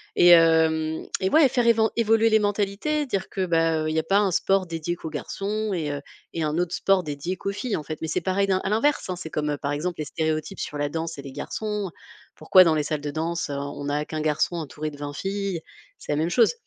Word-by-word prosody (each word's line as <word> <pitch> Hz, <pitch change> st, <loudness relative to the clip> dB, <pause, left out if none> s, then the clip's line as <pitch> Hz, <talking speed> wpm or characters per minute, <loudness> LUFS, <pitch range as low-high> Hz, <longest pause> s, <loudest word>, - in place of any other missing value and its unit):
et 175 Hz, 0 st, +8 dB
heu 160 Hz, -1 st, +3 dB, 0.2 s
et 190 Hz, -, +2 dB
ouais, 310 Hz, -4 st, +6 dB
faire 245 Hz, -1 st, +1 dB
év 230 Hz, -, +6 dB
faire 220 Hz, 0 st, +3 dB
évoluer 225 Hz, 0 st, +3 dB
les 220 Hz, -, +5 dB
mentalités, 205 Hz, +9 st, -1 dB
dire 195 Hz, -6 st, -2 dB
que, 190 Hz, -1 st, -2 dB
bah, 165 Hz, -2 st, +1 dB
il 155 Hz, -, -2 dB
y -, -, +3 dB
a -, -, -1 dB
pas 195 Hz, +4 st, +3 dB
un 205 Hz, -, +2 dB
sport 195 Hz, +1 st, +1 dB
dédié 165 Hz, +1 st, -3 dB
qu'aux 160 Hz, -, -7 dB
garçons 200 Hz, +8 st, -3 dB
et 155 Hz, -4 st, -2 dB
heu 145 Hz, -, -4 dB, 0.3 s
et 165 Hz, -, -2 dB
un 155 Hz, +2 st, 0 dB
autre 175 Hz, 0 st, -1 dB
sport 195 Hz, -1 st, +2 dB
dédié 150 Hz, +5 st, -4 dB
qu'aux 195 Hz, -, -3 dB
filles, 210 Hz, +2 st, -3 dB
en -, -, -4 dB
fait. 155 Hz, +1 st, -6 dB
Mais 160 Hz, -, -2 dB
c'est 160 Hz, -, -1 dB
pareil 195 Hz, +1 st, +1 dB
d 195 Hz, -, +1 dB
à 195 Hz, -, -1 dB
l'inverse, 225 Hz, 0 st, +1 dB
hein, 185 Hz, -, -1 dB
c'est 175 Hz, -3 st, -8 dB
comme 150 Hz, -1 st, -1 dB
par 140 Hz, -, -2 dB
exemple 165 Hz, +4 st, -2 dB
les 155 Hz, -, -2 dB
stéréotypes 155 Hz, +4 st, -2 dB
sur 145 Hz, -, -4 dB
la 145 Hz, 0 st, 0 dB
danse 165 Hz, 0 st, -4 dB
et 140 Hz, -, -8 dB
les 135 Hz, -, -8 dB
garçons. 210 Hz, +4 st, -4 dB, 0.5 s
Pourquoi 185 Hz, -1 st, +6 dB
dans 165 Hz, -2 st, +3 dB
les 150 Hz, -, +1 dB
salles 150 Hz, 0 st, -2 dB
de 145 Hz, -, -4 dB
danse, 165 Hz, +1 st, -2 dB
on 140 Hz, -, -3 dB, 0.3 s
on -, -, -1 dB
a 150 Hz, +1 st, -1 dB
qu'un 155 Hz, -1 st, -4 dB
garçon 155 Hz, +3 st, +1 dB
entouré 155 Hz, -1 st, -5 dB
de 145 Hz, -, -12 dB
20 145 Hz, 0 st, -5 dB
filles? 195 Hz, 0 st, -3 dB, 0.4 s
C'est -, -, -6 dB
la -, -, +2 dB
même 160 Hz, +2 st, +1 dB
chose. 235 Hz, -, +4 dB
170 Hz, 255 wpm, -25 LUFS, 155-200 Hz, 0.5 s, et